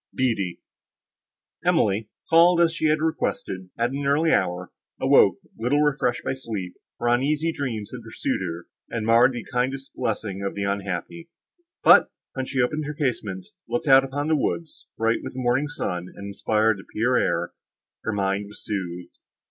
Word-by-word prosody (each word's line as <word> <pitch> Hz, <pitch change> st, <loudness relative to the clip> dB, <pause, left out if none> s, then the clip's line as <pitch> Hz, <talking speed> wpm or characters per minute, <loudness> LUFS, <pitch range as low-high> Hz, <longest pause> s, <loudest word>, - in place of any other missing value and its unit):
BEATTIE 105 Hz, -9 st, 0 dB, 1.0 s
Emily, 105 Hz, +2 st, +2 dB, 0.2 s
called, 170 Hz, +1 st, +6 dB
as 170 Hz, -1 st, +4 dB
she 160 Hz, -1 st, 0 dB
had 155 Hz, 0 st, +2 dB
requested, 95 Hz, -, -2 dB
at 120 Hz, +1 st, +1 dB
an 140 Hz, +1 st, -2 dB
early 155 Hz, +4 st, +3 dB
hour, 90 Hz, 0 st, 0 dB, 0.3 s
awoke, -, -, +5 dB, 0.2 s
little 130 Hz, +6 st, +2 dB
refreshed 135 Hz, -5 st, +1 dB
by -, -, -1 dB
sleep, 110 Hz, -9 st, -5 dB, 0.2 s
for 120 Hz, -, -2 dB
uneasy 145 Hz, +7 st, +2 dB
dreams 120 Hz, -9 st, -4 dB
had 125 Hz, -, -7 dB
pursued 110 Hz, -3 st, -3 dB
her, 85 Hz, -2 st, -5 dB, 0.2 s
and 115 Hz, -2 st, -3 dB
marred 115 Hz, +3 st, +5 dB
the 120 Hz, -2 st, -6 dB
kindest 130 Hz, +2 st, -1 dB
blessing 105 Hz, -5 st, -3 dB
of 100 Hz, -, -3 dB
the 100 Hz, -, -2 dB
unhappy. 100 Hz, -, -3 dB, 0.5 s
But, -, -, +7 dB, 0.2 s
when 130 Hz, -1 st, -3 dB
she 135 Hz, -2 st, +1 dB
opened 150 Hz, +4 st, -1 dB
her 150 Hz, +1 st, -5 dB
casement, 110 Hz, -, -2 dB, 0.2 s
looked 120 Hz, +5 st, -2 dB
out 135 Hz, -1 st, +8 dB
upon 145 Hz, +2 st, -3 dB
the 160 Hz, -, +3 dB
woods, 155 Hz, +3 st, -3 dB
bright 115 Hz, +1 st, +2 dB
with -, -, -7 dB
the -, -, -4 dB
morning 125 Hz, +4 st, +1 dB
sun, 90 Hz, -11 st, -4 dB
and 100 Hz, -, -8 dB
inspired 105 Hz, +1 st, +1 dB
the -, -, -11 dB
pure 125 Hz, +3 st, +2 dB
air, 85 Hz, +1 st, 0 dB, 0.5 s
her -, -, -1 dB
mind 100 Hz, 0 st, -1 dB
was 105 Hz, -, -12 dB
soothed. 90 Hz, -4 st, -5 dB
120 Hz, 170 wpm, -24 LUFS, 100-140 Hz, 1.0 s, out